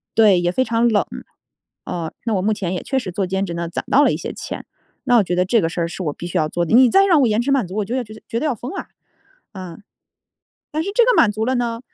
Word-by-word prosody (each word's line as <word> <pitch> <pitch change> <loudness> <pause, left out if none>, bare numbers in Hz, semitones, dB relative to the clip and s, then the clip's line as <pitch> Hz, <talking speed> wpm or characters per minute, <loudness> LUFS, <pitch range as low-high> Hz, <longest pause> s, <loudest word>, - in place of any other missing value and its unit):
对， 210 -5 +5
也 175 0 0
非 260 - +1
常 230 -1 +1
冷， 215 -3 +2 0.8
啊。 165 -2 -4
那 225 - 0
我 185 - 0
目 215 +3 +1
前 190 -4 -3
也 180 - -4
确 270 -1 0
实 185 -7 -6
做 190 +2 -1
兼 190 +1 -1
职 175 - -5
呢， 170 0 -3
攒 - - -4
到 285 - +6
了 - - +4
一 - - -1
些 - - -5
钱， - - -7 0.4
那 245 -2 +4
我 220 - +5
觉 180 - -3
得 180 - +3
这 230 +5 +3
个 - - +1
事 170 - -3
儿 170 - 0
是 185 - -6
我 150 -3 -2
必 175 - -7
须 175 - -2
要 155 - +2
做 175 - -1
的。 170 - +2
你 255 0 +7
再 390 +10 +5
让 345 -7 +4
我 255 - +4
延 215 +1 +1
迟 270 +3 -1
满 265 -8 +2
足， 185 - -8
我 210 - 0
就 235 +5 -3
觉 215 -2 -12
得 - - -14
觉 230 - -2
得 310 - -2
要 295 - +1
疯 245 +6 -7
了 385 - -6 0.7
啊， 185 -4 -9 0.9
但 310 +1 -1
是 395 - -3
这 475 - +5
个 - - +3
满 210 - +5
足 215 +1 -2
了 260 +1 +1
呢 235 -1 -2
215 Hz, 320 characters per minute, -20 LUFS, 180-250 Hz, 0.9 s, 你